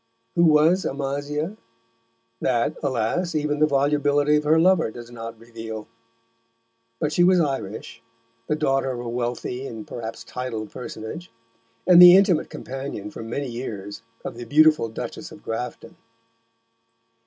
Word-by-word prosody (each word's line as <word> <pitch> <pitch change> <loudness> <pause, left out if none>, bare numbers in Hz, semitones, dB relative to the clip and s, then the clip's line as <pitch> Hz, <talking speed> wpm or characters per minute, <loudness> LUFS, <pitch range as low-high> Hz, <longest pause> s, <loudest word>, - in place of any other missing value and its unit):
Who 170 - +4
was 160 +4 +4
Amasia? 145 +6 -3 0.8
That, 120 -2 0
alas! 140 +7 -1
even 150 -1 0
the 155 - +5
volubility 145 +1 +2
of 150 - -2
her 160 +2 +4
lover 175 -5 +4
does 120 +1 -10
not 115 -1 -8
reveal. 115 -1 -8 1.1
But 150 - 0
she 175 - +4
was 185 0 +5
Irish, 125 - -3 0.5
the 150 - +1
daughter 135 -3 +1
of 120 - -6
a 120 - -5
wealthy 125 +2 -3
and 110 -2 -8
perhaps 115 -1 -7
titled 115 -5 -5
personage, 125 +8 -7 0.5
and 180 -1 +8
the 180 +1 +11
intimate 195 -4 +3
companion 130 -6 -6
for - - -8
many 120 +5 -4
years 105 -5 -6 0.2
of - - -5
the 120 - -7
beautiful 155 -1 +4
Duchess 110 - -7
of - - -13
Grafton. 115 +2 -5
135 Hz, 140 wpm, -24 LUFS, 115-155 Hz, 1.1 s, the